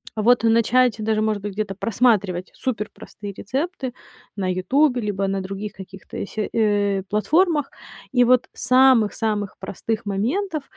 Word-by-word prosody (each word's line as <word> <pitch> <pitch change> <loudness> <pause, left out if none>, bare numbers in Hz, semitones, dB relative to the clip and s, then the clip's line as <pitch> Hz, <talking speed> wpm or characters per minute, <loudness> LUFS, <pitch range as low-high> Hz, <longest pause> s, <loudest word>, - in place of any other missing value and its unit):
Вот 230 +2 +3
начать 230 +1 +3
даже, 215 0 0
может 215 -2 0
быть, 205 -2 -4
где-то 205 -1 -3
просматривать 205 -4 +1
суперпростые 210 -3 -5
рецепты 265 - -3 0.4
на 190 -2 -2
"Ютубе", 250 +8 +2
либо 200 -2 -1
на 195 0 -1
других 195 +2 -6
каких-то 190 +1 -8
се 215 0 -4
э, 205 -3 +1
платформах. 300 - +2 0.4
И 245 -1 +4
вот 250 0 +3
с - - -6
самых 255 -4 +5
самых 210 -3 -2
простых 215 +4 -4
моментов 290 - -1
215 Hz, 140 wpm, -22 LUFS, 200-255 Hz, 0.4 s, самых